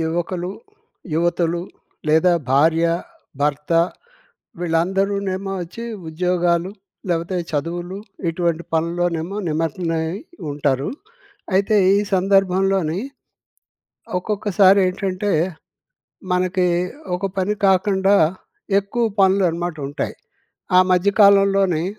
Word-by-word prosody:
యువకులు, 175 +2 -2 0.6
యువతులు 170 +1 +1 0.5
లేదా 160 +4 +4 0.2
భార్య, 160 +5 +4 0.6
భర్త 150 +2 -1 0.9
వీళ్ళందరూనేమో 190 +3 -1
వచ్చి 180 +7 -8 0.2
ఉద్యోగాలు, 175 +1 0 0.4
లేకపోతే 170 +2 -1
చదువులు 175 +5 -3 0.3
ఇటువంటి 170 0 -1
పనుల్లోనేమో 170 +2 -1
నిమగ్నమై 165 +1 -1 0.5
ఉంటారు. 140 -2 0 0.7
అయితే 200 +3 +3 0.2
ఈ - - +4 0.2
సందర్భంలోనీ, 190 -2 +2 1.2
ఒక్కొక్కసారి 200 -1 +3
ఏంటంటే, 190 +2 -2 1.0
మనకి 180 0 +1 0.5
ఒక 185 +2 -3
పని 195 +3 0
కాకుండా, 195 +1 +3 0.6
ఎక్కువ 200 +4 -2 0.2
పనులనమాట 175 -3 +2
ఉంటాయి. 145 - -4 0.6
ఆ - - +9
మధ్య 180 +2 +3
కాలంలోని 195 -4 +4
180 Hz, 80 wpm, -21 LUFS, 165-195 Hz, 1.2 s, ఆ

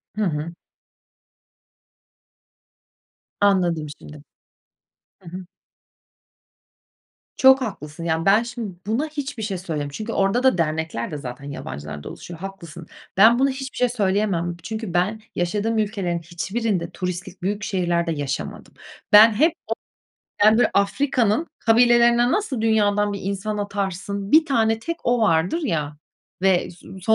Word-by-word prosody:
Hı 215 - -2
hı. 160 -3 -2 2.9
Anladım 175 -6 +2
şimdi. 150 -1 -12 1.0
Hı 175 - -11
hı. 180 +2 -8 1.9
Çok 265 0 +6
haklısın. 170 - -6
Yani, 165 0 -1
ben 205 +4 +5
şimdi 235 -5 -6
buna 235 +8 0
hiçbir 285 -6 -5
şey 200 -3 -2
söylem 155 -5 -4
Çünkü 215 +11 -6
orada 195 +6 +1
da 260 -8 +4
dernekler 160 -6 -2
de 150 - -4
zaten 130 -1 -8
yabancılardan 75 - -7
oluşuyor, 170 -2 -10
haklısın. 175 -4 -9 0.3
Ben 225 +5 +6
buna 275 +1 +3
hiçbir 265 0 -5
bir - - -11
şey 250 - +2
söyleyemem. 195 -6 0
Çünkü 220 -4 -5
ben 195 +5 0
yaşadığım 210 +6 -1
ülkelerin 200 -5 -1
hiçbirinde 180 +2 -3
turistik 180 +1 -6
büyük 200 +3 -2
şehirlerde 175 -4 0
yaşamadım. 145 -3 -5 0.4
Ben 215 +2 +9
hep 310 +10 +3
o - - 0 0.8
böyle 245 - +4
Afrika'nın 240 +5 +1
kabilelerine 240 +1 +4
nasıl 295 - -1
dünyadan 205 -2 +2
bir 200 - -4
insan 200 +2 -3
atarsın, 200 0 -3
1 315 +1 +6
tane 225 -6 +1
tek 335 +8 -4
o 240 0 +2
vardır 180 - +2
ya 150 - -2 0.4
ve 190 -2 +2
so 180 +2 -13
200 Hz, 130 wpm, -22 LUFS, 170-225 Hz, 2.9 s, Ben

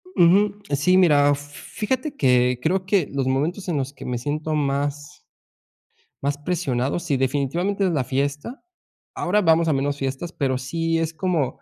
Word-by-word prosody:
Ujú. 200 +4 +4 0.2
Sí, 180 +7 +3
mira, 145 -5 +5
fíjate 210 - -4
que 125 -2 +3
creo 185 +5 0
que 195 -5 +2
los 135 -2 -1
momentos 160 +9 -1
en 165 -4 -1
los 135 +1 -3
que - - -11
me 125 -1 -2
siento 150 +5 -3
más 145 +1 -2 1.0
más 140 +1 0
presionado, 145 -4 -1
sí, 165 -6 -1
definitivamente 145 +10 -1
es 175 - +1
la 135 -5 0
fiesta. 145 - -3 0.5
Ahora 205 +4 +1
vamos 165 -1 +3
a - - +3
menos 140 +1 0
fiestas, 135 +6 -4
pero 130 -3 -1
sí 165 +5 -1
es 165 0 -2
como 165 -6 -1
145 Hz, 160 wpm, -23 LUFS, 135-175 Hz, 1.0 s, mira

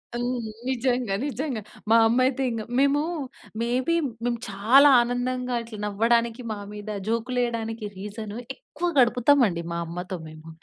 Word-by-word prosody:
హ్మ్. 240 -1 -2 0.2
నిజంగా. 250 -4 0
నిజంగా. 275 -4 -3 0.3
మా - - +7
అమ్మ 235 +3 +2
అయితే 270 0 -1
ఇంక 230 -1 -3 0.2
మేము 280 +1 +3 0.6
మే‌ 235 - 0 0.2
బి 335 - +3 0.3
మేము 240 -1 0
చాలా 230 +9 +6
ఆనందంగా 250 +1 -1
ఇట్లా 225 -2 -9
నవ్వడానికి, 230 +3 +1
మా - - -6 0.2
మీద 210 0 -8 0.2
జోక్‌లు 230 +3 -1
వేయడానికి, 225 -2 -2
రీజన్ 210 +2 -6 0.2
ఎక్కువ 330 +6 -5
గడుపుతాం 250 +3 +4
అండి, 170 -3 -3
మా 170 - -2
అమ్మతో 180 +3 -5
మేము. 155 +1 -12
235 Hz, 145 wpm, -25 LUFS, 215-255 Hz, 0.6 s, మా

